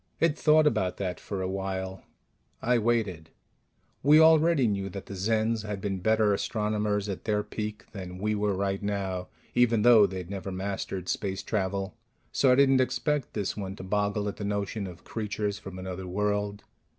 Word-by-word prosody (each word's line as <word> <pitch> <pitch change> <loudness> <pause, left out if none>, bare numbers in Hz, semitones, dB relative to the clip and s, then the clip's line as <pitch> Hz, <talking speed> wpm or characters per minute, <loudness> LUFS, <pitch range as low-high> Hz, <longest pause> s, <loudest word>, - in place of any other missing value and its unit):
It 165 -2 +3
thought 155 0 +4
about 95 -11 +1
that 90 -2 -3
for 95 -2 -4
a - - -1
while. 95 0 -3 0.6
I 120 0 +2
waited. 105 -8 0 0.7
We 150 +3 +7
already 160 -3 +5
knew 100 -3 -1
that 100 0 -7
the - - -8
Zens 110 +3 +1
had 105 -2 -4
been 95 -1 -2
better 110 +1 +3
astronomers 105 -1 -1
at 100 -3 -5
their 105 -1 +1
peak 105 0 -5
than 90 -3 -7
we 105 +3 0
were 105 -1 0
right 100 0 -1
now, 95 -3 -2 0.3
even 120 -3 +3
though 115 -4 +7
they'd 95 -1 -6
never 95 -1 -4
mastered 95 -1 -4
space 95 -2 -2
travel; 95 -2 -2 0.4
so 135 - +4
I - - +6
didn't 135 -1 +5
expect 145 +1 -1
this 100 -3 -1
one 95 -2 -5
to 95 - -9
boggle 105 +1 0
at 100 - -4
the - - -5
notion 100 0 -2
of 90 -2 -11
creatures 105 -2 -3
from 95 -1 -9
another 95 0 -6
world. 105 +1 -1
100 Hz, 175 wpm, -28 LUFS, 95-110 Hz, 0.7 s, We